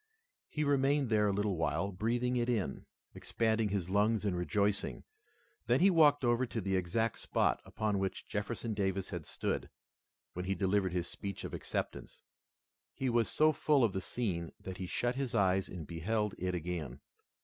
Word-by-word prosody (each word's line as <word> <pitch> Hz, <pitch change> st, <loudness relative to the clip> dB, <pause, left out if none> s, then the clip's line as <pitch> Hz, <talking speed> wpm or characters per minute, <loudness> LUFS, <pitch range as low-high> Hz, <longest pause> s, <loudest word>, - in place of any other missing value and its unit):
He 150 Hz, -, -1 dB
remained 140 Hz, -1 st, +2 dB
there 105 Hz, -2 st, +3 dB
a -, -, +2 dB
little 100 Hz, -1 st, 0 dB
while, 80 Hz, +5 st, 0 dB
breathing 120 Hz, +6 st, 0 dB
it 120 Hz, 0 st, +1 dB
in, 110 Hz, -6 st, -1 dB, 0.3 s
expanding 110 Hz, -1 st, 0 dB
his 100 Hz, -4 st, -1 dB
lungs, 105 Hz, +2 st, +2 dB
and 100 Hz, -3 st, +1 dB
rejoicing. 100 Hz, +3 st, 0 dB, 0.6 s
Then -, -, +4 dB
he 195 Hz, +2 st, +6 dB
walked 145 Hz, -5 st, +5 dB
over 120 Hz, +1 st, +2 dB
to 115 Hz, -, -3 dB
the 95 Hz, -1 st, 0 dB
exact 95 Hz, +5 st, 0 dB
spot -, -, +1 dB
upon 105 Hz, -2 st, -1 dB
which 95 Hz, -1 st, -3 dB
Jefferson 110 Hz, +2 st, -3 dB
Davis 95 Hz, -2 st, -1 dB
had 85 Hz, -5 st, -5 dB
stood, -, -, -2 dB, 0.6 s
when 90 Hz, +1 st, -4 dB
he 95 Hz, +1 st, 0 dB
delivered 95 Hz, -2 st, +1 dB
his 90 Hz, -2 st, -1 dB
speech 100 Hz, -2 st, -6 dB
of -, -, -6 dB
acceptance. -, -, -4 dB, 0.7 s
He 130 Hz, -2 st, 0 dB
was 115 Hz, -1 st, +2 dB
so 155 Hz, 0 st, +4 dB
full 145 Hz, -2 st, +3 dB
of 110 Hz, -5 st, +2 dB
the 95 Hz, -, -2 dB
scene 90 Hz, -7 st, -3 dB
that 95 Hz, -1 st, -7 dB
he 95 Hz, -, -4 dB
shut 120 Hz, +6 st, 0 dB
his 130 Hz, -3 st, -2 dB
eyes 95 Hz, -2 st, +2 dB
and 85 Hz, -4 st, -6 dB
beheld 105 Hz, +6 st, -1 dB
it 90 Hz, 0 st, -1 dB
again. 80 Hz, -6 st, -4 dB
105 Hz, 175 wpm, -33 LUFS, 95-120 Hz, 0.7 s, he